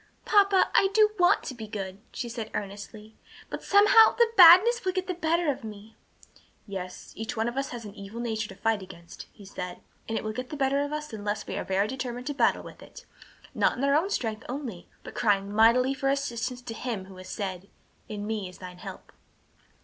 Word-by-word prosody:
"Papa, 395 Hz, -2 st, +4 dB
I 390 Hz, -, +5 dB
do 425 Hz, -1 st, +5 dB
want 355 Hz, -, +4 dB
to -, -, -5 dB
be 225 Hz, -3 st, -8 dB
good," 195 Hz, -3 st, -6 dB
she 245 Hz, -, -5 dB
said 230 Hz, -2 st, -5 dB
earnestly, 205 Hz, +2 st, -7 dB, 0.4 s
"but -, -, -5 dB
somehow 415 Hz, +2 st, +6 dB
the 470 Hz, -1 st, +3 dB
badness 385 Hz, +7 st, +8 dB
will 370 Hz, -1 st, 0 dB
get 370 Hz, 0 st, -1 dB
the 370 Hz, -, -2 dB
better 335 Hz, -2 st, +1 dB
of 260 Hz, -, -8 dB
me." 215 Hz, 0 st, -10 dB, 0.7 s
"Yes; 185 Hz, -3 st, -7 dB
each 225 Hz, +1 st, -5 dB
one 225 Hz, +1 st, 0 dB
of 240 Hz, -, -3 dB
us 275 Hz, 0 st, -2 dB
has 235 Hz, -2 st, -7 dB
an 205 Hz, -, -9 dB
evil 200 Hz, +2 st, -9 dB
nature 220 Hz, -2 st, -2 dB
to 195 Hz, -, -10 dB
fight 220 Hz, +1 st, 0 dB
against," 170 Hz, -2 st, -11 dB
he 205 Hz, -, -15 dB
said, 180 Hz, -2 st, -7 dB, 0.3 s
"and 225 Hz, -, -1 dB
it -, -, -3 dB
will 215 Hz, 0 st, -3 dB
get 250 Hz, +2 st, -5 dB
the 300 Hz, -, -6 dB
better 275 Hz, 0 st, +1 dB
of 285 Hz, 0 st, -3 dB
us 300 Hz, -3 st, -5 dB
unless 205 Hz, -1 st, -3 dB
we -, -, -5 dB
are -, -, -2 dB
very 195 Hz, +2 st, 0 dB
determined 250 Hz, 0 st, -5 dB
and 290 Hz, -, -4 dB
battle -, -, +3 dB
with -, -, -12 dB
it, -, -, -13 dB, 0.5 s
not -, -, +1 dB
in 255 Hz, -, -3 dB
our 280 Hz, 0 st, +3 dB
own 325 Hz, +7 st, +2 dB
strength 220 Hz, -, -2 dB
only, 245 Hz, -9 st, -6 dB, 0.2 s
but -, -, -9 dB
crying 200 Hz, -2 st, +1 dB
mightily 235 Hz, +5 st, +4 dB
for 270 Hz, 0 st, -1 dB
assistance 250 Hz, -3 st, -2 dB
to 230 Hz, -, -6 dB
Him 225 Hz, -5 st, -4 dB
who 190 Hz, -1 st, -13 dB
has 185 Hz, 0 st, -10 dB
said, 190 Hz, -2 st, -5 dB, 0.4 s
'In 205 Hz, -1 st, -5 dB
me 210 Hz, -3 st, -3 dB
is 180 Hz, -, -14 dB
thine 180 Hz, -1 st, -10 dB
help.' -, -, -10 dB
230 Hz, 220 wpm, -27 LUFS, 205-285 Hz, 0.7 s, badness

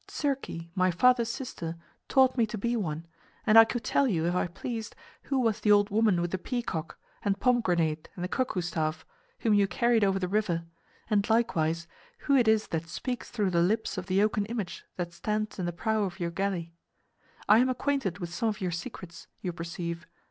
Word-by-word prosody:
Circe, 280 Hz, -2 st, -2 dB, 0.2 s
my 185 Hz, 0 st, +2 dB
father's 235 Hz, +5 st, +4 dB
sister, 180 Hz, -9 st, -5 dB, 0.3 s
taught 260 Hz, -1 st, +4 dB
me 235 Hz, -3 st, +2 dB
to 215 Hz, -, -5 dB
be 235 Hz, +4 st, 0 dB
one, 165 Hz, -7 st, -3 dB, 0.4 s
and 215 Hz, -, +4 dB
I 225 Hz, 0 st, +11 dB
could 235 Hz, 0 st, -3 dB
tell 275 Hz, +5 st, +2 dB
you, 165 Hz, -8 st, 0 dB
if 175 Hz, -, +1 dB
I 180 Hz, -, +1 dB
pleased, 220 Hz, +5 st, -6 dB, 0.3 s
who 275 Hz, -, 0 dB
was 225 Hz, -4 st, +1 dB
the 210 Hz, -, +3 dB
old 205 Hz, 0 st, +5 dB
woman 210 Hz, -4 st, +3 dB
with 175 Hz, 0 st, -2 dB
the 190 Hz, -, -2 dB
peacock, 185 Hz, -9 st, -4 dB, 0.3 s
the 200 Hz, -1 st, +2 dB
pomegranate 175 Hz, -10 st, +1 dB
and 175 Hz, -, -5 dB
the -, -, -1 dB
cuckoo 245 Hz, -3 st, -1 dB
staff, 160 Hz, -2 st, -2 dB, 0.4 s
whom 225 Hz, -3 st, +3 dB
you 200 Hz, -1 st, +4 dB
carried 235 Hz, +3 st, +2 dB
over 195 Hz, -1 st, +3 dB
the 185 Hz, -1 st, -1 dB
river; 180 Hz, -4 st, 0 dB, 0.4 s
and 210 Hz, -1 st, +1 dB
likewise, 170 Hz, -8 st, +1 dB, 0.3 s
who 280 Hz, -, +2 dB
it 245 Hz, -4 st, +4 dB
is 220 Hz, -1 st, +3 dB
that 165 Hz, 0 st, -3 dB
speaks 245 Hz, +9 st, -4 dB
through 205 Hz, -5 st, 0 dB
the 170 Hz, -1 st, +3 dB
lips 215 Hz, +6 st, +1 dB
of 185 Hz, 0 st, -5 dB
the 195 Hz, +1 st, +3 dB
oaken 210 Hz, -1 st, +1 dB
image 215 Hz, -6 st, -5 dB
that 175 Hz, -1 st, -4 dB
stands 215 Hz, +4 st, -2 dB
in 180 Hz, -, -1 dB
the -, -, -1 dB
prow 220 Hz, +6 st, 0 dB
of 185 Hz, 0 st, -6 dB
your 170 Hz, -1 st, -2 dB
galley. 170 Hz, -2 st, -2 dB, 0.7 s
I 210 Hz, +2 st, +7 dB
am 255 Hz, +1 st, +3 dB
acquainted 255 Hz, -, -1 dB
with 175 Hz, -3 st, -6 dB
some 225 Hz, +6 st, 0 dB
of 210 Hz, -, -4 dB
your 185 Hz, -2 st, -1 dB
secrets, 170 Hz, +1 st, -7 dB
you 180 Hz, -, -3 dB
perceive. 170 Hz, 0 st, -5 dB
200 Hz, 205 wpm, -29 LUFS, 175-225 Hz, 0.7 s, I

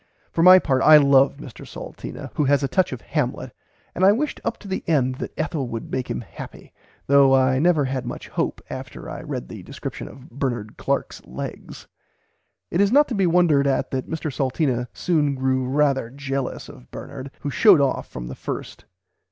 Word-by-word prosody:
For 165 Hz, -, 0 dB
my 185 Hz, +2 st, +9 dB
part 135 Hz, -7 st, +1 dB
I 155 Hz, 0 st, +9 dB
love 140 Hz, -1 st, +4 dB
Mr 140 Hz, -5 st, -11 dB
Salteena, -, -, -8 dB
who 150 Hz, -, 0 dB
has 140 Hz, +1 st, +3 dB
a -, -, +1 dB
touch 185 Hz, +5 st, +1 dB
of 130 Hz, -2 st, -6 dB
Hamlet, 145 Hz, -5 st, -3 dB, 0.4 s
and 185 Hz, -, -2 dB
I 195 Hz, -, +8 dB
wished 280 Hz, +7 st, -2 dB
up 230 Hz, -, -2 dB
to 205 Hz, -, -13 dB
the 190 Hz, -, -3 dB
end 130 Hz, -5 st, +1 dB
that -, -, -5 dB
Ethel 155 Hz, -4 st, -2 dB
would 115 Hz, -1 st, -6 dB
make 130 Hz, -1 st, -3 dB
him -, -, -3 dB
happy, 110 Hz, -, -11 dB, 0.3 s
though 140 Hz, -1 st, +5 dB
I 130 Hz, 0 st, +3 dB
never 160 Hz, -2 st, +3 dB
had 130 Hz, -1 st, -3 dB
much 120 Hz, -, -6 dB
hope -, -, -2 dB
after -, -, -8 dB
I -, -, -6 dB
read 60 Hz, -, -5 dB
the -, -, -9 dB
description -, -, -7 dB
of 130 Hz, -1 st, -14 dB
Bernard 120 Hz, -5 st, -3 dB
Clark's -, -, -2 dB
legs. -, -, -8 dB, 0.9 s
It 175 Hz, -, +2 dB
is 200 Hz, 0 st, +3 dB
not 290 Hz, +3 st, +5 dB
to -, -, -2 dB
be 195 Hz, -4 st, +2 dB
wondered 165 Hz, -5 st, +3 dB
at 135 Hz, -, 0 dB
that 130 Hz, -1 st, -3 dB
Mr 160 Hz, -3 st, -4 dB
Salteena 130 Hz, -2 st, 0 dB
soon 150 Hz, -5 st, 0 dB
grew 130 Hz, -1 st, 0 dB
"rarther 140 Hz, -3 st, +1 dB
jellous" 135 Hz, 0 st, -4 dB
of 60 Hz, -, -14 dB
Bernard, 140 Hz, -1 st, -8 dB
who 145 Hz, -, -3 dB
showed 200 Hz, +1 st, +6 dB
off 140 Hz, -2 st, 0 dB
from -, -, -7 dB
the -, -, -6 dB
first. -, -, -7 dB
140 Hz, 195 wpm, -23 LUFS, 130-160 Hz, 0.9 s, my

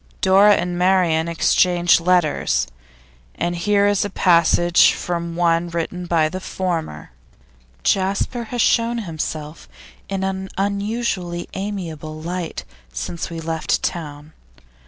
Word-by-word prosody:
Dora 195 Hz, +2 st, +6 dB
and 175 Hz, 0 st, -2 dB
Marian 180 Hz, -3 st, +2 dB
exchanged 175 Hz, +1 st, +3 dB
letters, 175 Hz, -3 st, +2 dB, 0.7 s
and 175 Hz, 0 st, -2 dB
here 200 Hz, +3 st, +2 dB
is 205 Hz, -1 st, +2 dB
a 205 Hz, -, -3 dB
passage 175 Hz, -1 st, +4 dB
from 170 Hz, -1 st, -4 dB
one 170 Hz, 0 st, +1 dB
written 170 Hz, +1 st, -4 dB
by 165 Hz, -2 st, +2 dB
the 185 Hz, +4 st, -5 dB
former: 165 Hz, -, -4 dB, 0.7 s
'Jasper 200 Hz, +5 st, 0 dB
has 240 Hz, +1 st, -1 dB
shown 235 Hz, 0 st, +2 dB
himself 155 Hz, -2 st, -6 dB, 0.4 s
in 195 Hz, -1 st, -2 dB
an 190 Hz, 0 st, -3 dB
unusually 200 Hz, -3 st, -2 dB
amiable 165 Hz, -6 st, -5 dB
light 170 Hz, +1 st, -5 dB, 0.3 s
since 60 Hz, -, -5 dB
we 165 Hz, -1 st, -6 dB
left 160 Hz, -1 st, -2 dB
town. 150 Hz, -2 st, -5 dB
175 Hz, 115 wpm, -20 LUFS, 165-190 Hz, 0.7 s, Dora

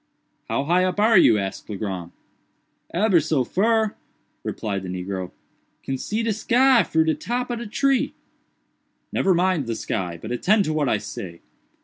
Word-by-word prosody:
"How -, -, 0 dB
high 175 Hz, +5 st, +2 dB
up 185 Hz, +1 st, -1 dB
are 220 Hz, +2 st, +5 dB
you?" 110 Hz, -, +6 dB
asked 95 Hz, +1 st, -4 dB
Legrand. 95 Hz, -4 st, -4 dB, 0.8 s
"Ebber 185 Hz, 0 st, +3 dB
so 155 Hz, -3 st, +1 dB
fur," 220 Hz, -, +1 dB, 0.5 s
replied 100 Hz, -3 st, -3 dB
the 95 Hz, -, -7 dB
negro; 90 Hz, 0 st, -4 dB, 0.5 s
"can 135 Hz, -1 st, -3 dB
see 215 Hz, -, -2 dB
de 225 Hz, -1 st, +1 dB
sky 250 Hz, +4 st, +4 dB
fru 160 Hz, 0 st, +2 dB
de 160 Hz, 0 st, +1 dB
top 245 Hz, +6 st, -3 dB
ob 240 Hz, -, -3 dB
de 235 Hz, -, -6 dB
tree." 270 Hz, +4 st, +1 dB, 1.0 s
"Never 190 Hz, -2 st, +2 dB
mind 175 Hz, -6 st, +1 dB
the 115 Hz, -, -2 dB
sky, 90 Hz, -5 st, -3 dB
but -, -, -7 dB
attend 200 Hz, -, +2 dB
to 155 Hz, -, -1 dB
what 150 Hz, -4 st, +1 dB
I 110 Hz, -, +2 dB
say. 85 Hz, -4 st, -8 dB
160 Hz, 165 wpm, -23 LUFS, -, 1.0 s, you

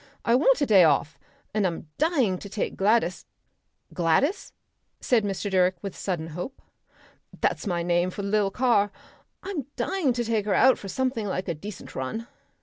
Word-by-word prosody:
I 230 Hz, -, +3 dB
want -, -, +4 dB
a -, -, +4 dB
day 200 Hz, -7 st, +6 dB
off, 155 Hz, 0 st, +2 dB, 0.3 s
and 210 Hz, -3 st, +2 dB
I'm 165 Hz, -2 st, -5 dB
dying 270 Hz, -, +2 dB
to 200 Hz, -, -9 dB
take 205 Hz, -, -3 dB
Gladys 195 Hz, -2 st, +1 dB, 0.3 s
" -, -, -28 dB
"Gladys?" 180 Hz, -, +1 dB, 0.5 s
said 235 Hz, -4 st, +2 dB
Mr. 200 Hz, 0 st, -3 dB
Direck 185 Hz, -1 st, +3 dB
with 195 Hz, -2 st, -5 dB
sudden 170 Hz, -4 st, -3 dB
hope. 180 Hz, -, -6 dB, 0.8 s
"That's -, -, 0 dB
my 175 Hz, -2 st, -1 dB
name 175 Hz, +1 st, +1 dB
for 200 Hz, +2 st, -6 dB
the 200 Hz, -, -3 dB
lil' 210 Hz, -1 st, +2 dB
car. 205 Hz, -2 st, +2 dB, 0.5 s
I'm 360 Hz, -9 st, -4 dB
dying 370 Hz, -8 st, 0 dB
to 240 Hz, 0 st, -1 dB
take 220 Hz, -3 st, 0 dB
her 250 Hz, +6 st, +5 dB
for 200 Hz, -, -9 dB
something 245 Hz, 0 st, -1 dB
like 185 Hz, -1 st, -3 dB
a 170 Hz, -, 0 dB
decent 190 Hz, +5 st, -9 dB
run. 130 Hz, -, -4 dB
205 Hz, 175 wpm, -26 LUFS, 180-240 Hz, 0.8 s, day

